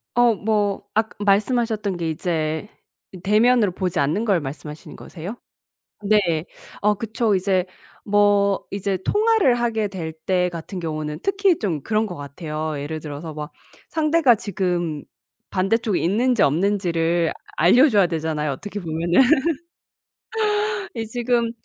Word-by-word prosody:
어 240 -2 +4
뭐 205 -1 0
아까 220 0 0
말씀하셨던 210 -1 +1
게 165 -2 -2
이제 160 +2 -2 0.4
이 185 - -10
대면으로 215 +1 +4
보지 180 -1 -3
않는 160 +11 +1
걸 195 -6 +2
말씀하시는 150 +2 -8
거세요? 185 +6 -8 0.7
네. 210 +1 +4 0.6
어 210 +1 +4
그쵸. 220 0 0
이제 185 -1 +1 0.4
뭐 205 -1 +3
이제 200 -1 -2
통화를 425 - +3
하게 230 -3 0
될 170 -5 -5
때 180 -1 +2
같은 170 +3 -7
경우는 155 -2 -4
특히 395 -3 +2
좀 175 -9 -2
그런 215 +5 +1
것 180 -5 -6
같아요. 155 +2 -5
예를 155 +3 -4
들어서 150 +1 -7
막 150 +1 -7 0.4
상대가 305 -4 +3
지금 175 -7 -2 0.5
반대쪽에 200 +1 +1
있는지 235 +6 +2
없는지를 170 0 +1 0.2
알려 245 - +6
줘야 200 -6 +4
되잖아요, 160 -2 -2
어떻게 205 +10 -6
보면은. 170 +5 +2 1.7
이 225 -1 -3
지금 235 0 0
195 Hz, 275 characters per minute, -22 LUFS, 165-220 Hz, 1.7 s, 알려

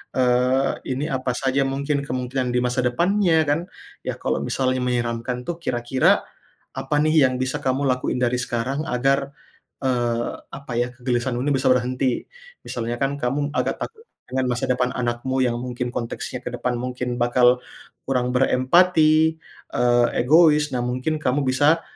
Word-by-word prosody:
eee, 125 +1 +2 0.2
ini 135 +3 -2
apa 130 -1 -1
saja 135 +1 +1
mungkin 140 +1 -1
kemungkinan 125 0 -2
di 125 - +3
masa 125 +1 0
depannya 170 +5 +2
kan, 150 +3 +2 0.4
ya - - -3
kalau - - -1
misalnya 130 -1 0
menyeramkan 120 0 -2
tuh 175 - -2
kira-kira 120 0 +2 0.5
apa 150 - -2
nih 155 -1 +4
yang 130 - -3
bisa 130 +3 -1
kamu 130 +2 0
lakuin 125 0 0
dari 125 0 +2
sekarang 125 +4 -2
agar, 135 +2 +1 0.5
eee, 120 -2 0 0.2
apa 140 -2 -8
ya, 120 0 0
kegelisahan 120 0 -1
ini 145 - 0
bisa 130 0 0
berhenti. 125 0 +1 0.4
Misalnya 120 0 -3
kan 135 +1 +1
kamu 145 +3 -1
agak - - 0
takut 455 0 -7 0.2
dengan 130 0 -1
masa 120 - -2
depan 125 0 +1
anakmu 125 +2 -1
yang 120 -1 0
mungkin 125 0 -4
konteksnya 115 -1 -4
ke - - -2
depan 125 -1 -2
mungkin 125 0 -3
bakal 125 +1 +4 0.5
kurang 125 -2 0
berempati, 160 +4 +4 0.3
eee, 120 0 +3
egois. 150 +2 +5
Nah 125 - 0
mungkin 130 +6 -1
kamu 130 +2 +1
bisa 145 +5 +3
130 Hz, 155 wpm, -22 LUFS, 125-140 Hz, 0.5 s, egois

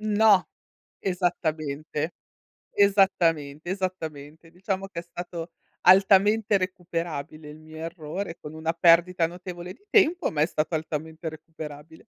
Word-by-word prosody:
No. 215 -2 +4 0.5
Esattamente. 155 -4 -2 0.6
Esattamente, 175 -6 +2
esattamente. 160 -5 -5
Diciamo 190 +2 -4
che 180 - -6
è - - -5
stato 170 0 -7 0.3
altamente 200 +3 +5
recuperabile 165 -5 -4
il 150 +1 -11
mio 155 0 -13
errore, 165 +2 -5
con 150 +1 -9
una 160 +1 -1
perdita 170 0 +4
notevole 180 0 -8
di 250 - -25
tempo, 360 -4 +3
ma 150 - -1
è 155 - +6
stato 155 -1 -2
altamente 160 +1 -4
recuperabile. 155 0 -9
170 Hz, 120 wpm, -26 LUFS, 155-190 Hz, 0.6 s, è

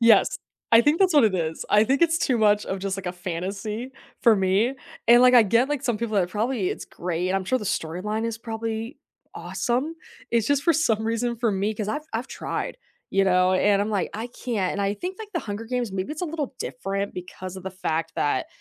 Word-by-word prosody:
Yes, 230 -1 +5 0.3
I 230 - +9
think 295 +6 +3
that's 370 -4 +3
what 285 - +7
it 210 -4 +3
is. 160 -2 -2
I 210 +1 +6
think 270 +7 +1
it's 330 0 +4
too 255 -7 +1
much 210 -1 +4
of 190 - -3
just, 195 0 -2
like, 195 -2 -7
a 180 - -1
fantasy 195 +8 -4 0.3
for 230 -3 +7
me, 195 +6 +2 0.3
and, 240 +1 +8
like, 255 0 +7
I 240 - +9
get, 230 +5 +3
like, 295 -2 -2
some 240 -6 0
people 225 -2 -2
are 185 -3 +3
probably, 215 +1 -1
"It's - - -5
great," 180 +1 -2
I'm 195 0 0
sure 255 +7 +1
the 210 - -6
storyline 195 +6 -2
is 230 -1 -4
probably 225 +2 -4 0.4
awesome. 260 +7 -2 0.4
It's 230 -2 +2
just 285 -1 +2
for 335 - +4
some 225 -9 +1
reason 235 +1 -1
for 230 -1 +1
me 200 +2 0
cause 210 -1 -3
I've 295 +8 -2
I've 235 +4 -2
tried, - - -4 0.3
you 195 0 +3
know, 185 -1 +4
and 200 +1 +3
I'm 205 - -2
like, 200 -4 -1
"I 220 +3 -3
can't," 230 -6 -2
and 200 - -3
I 200 +1 0
think, 360 - -5
like, 440 -2 -7
The 340 - 0
Hunger 210 0 -5
Games, 245 -4 -2
maybe 190 +9 -3
it's 310 - -6
a 355 - 0
little 300 -4 -4
different 200 -3 -3
because 180 +1 -7
of 185 - -8
the 190 - -5
fact 165 -3 -2
that 145 -3 0
220 Hz, 230 wpm, -25 LUFS, 190-245 Hz, 0.4 s, I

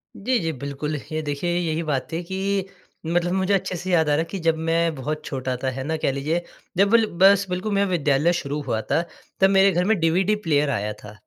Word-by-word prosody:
जी, 250 +5 0
जी, 165 -2 -1
बिल्कुल। 140 +2 -4 0.2
ये 155 0 -1
देखिए 150 +4 -2
यही 165 -2 -1
बात 140 -4 -2
थी 165 +2 -2
कि 190 +2 -2 0.4
मतलब 175 +2 0
मुझे 190 +1 +1
अच्छे 190 -1 0
से 180 +2 -4
याद 160 -4 +3
आ - - +3
रहा - - +1
है 165 - 0
कि 195 - -4
जब 165 -1 +1
मैं 165 0 +2
बहुत 150 +3 -4
छोटा 130 -2 -3
था 130 - +1
है 130 +1 -5
ना 160 +3 -2
कह - - +3
लीजिए 150 +5 -1 0.4
जब 200 +3 +3
ल 225 - +5 0.2
बस 195 0 +6
बिल्कुल 185 +4 -2
मेरा 200 0 +2
विद्यालय 155 -1 +2
शुरू 145 -3 -3
हुआ 110 -3 0
था - - +3 0.4
तब 190 0 +5
मेरे 195 0 +5
घर 175 +1 +1
में 220 -1 +3
डीवीडी 180 +6 +2
प्लेयर 145 -1 +2
आया 105 -4 -1
था। 105 0 -12
165 Hz, 235 wpm, -23 LUFS, 145-190 Hz, 0.4 s, बस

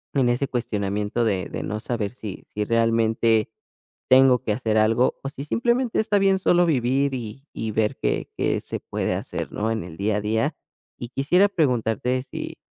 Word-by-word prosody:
en 130 -3 +3
ese 125 +3 0
cuestionamiento 105 -2 -1
de 95 -4 -1
de - - -5
no 105 +1 -3
saber 115 -4 -2
si 105 -6 -8
si 105 - 0
realmente 115 -1 +2 0.6
tengo 130 -1 +6
que 110 - -1
hacer 110 -1 0
algo, 115 +3 +3
o 135 - -3
si 140 0 -8
simplemente 240 - +1
está 210 -2 +2
bien 195 -1 +3
solo 175 -1 +4
vivir 135 0 +1
y 125 +4 -7
y 110 -1 -3
ver 105 0 0
qué - - -1
qué - - +1
se - - -4
puede - - -2
hacer, - - -4
¿no?, 110 +2 -1
en 110 -5 -2
el 80 -2 -10
día 105 +1 0
a - - -2
día. 110 +2 0 0.5
Y 120 - -5
quisiera 175 +10 +3
preguntarte 125 - 0
si, - - -7
120 Hz, 185 wpm, -24 LUFS, 110-135 Hz, 0.6 s, tengo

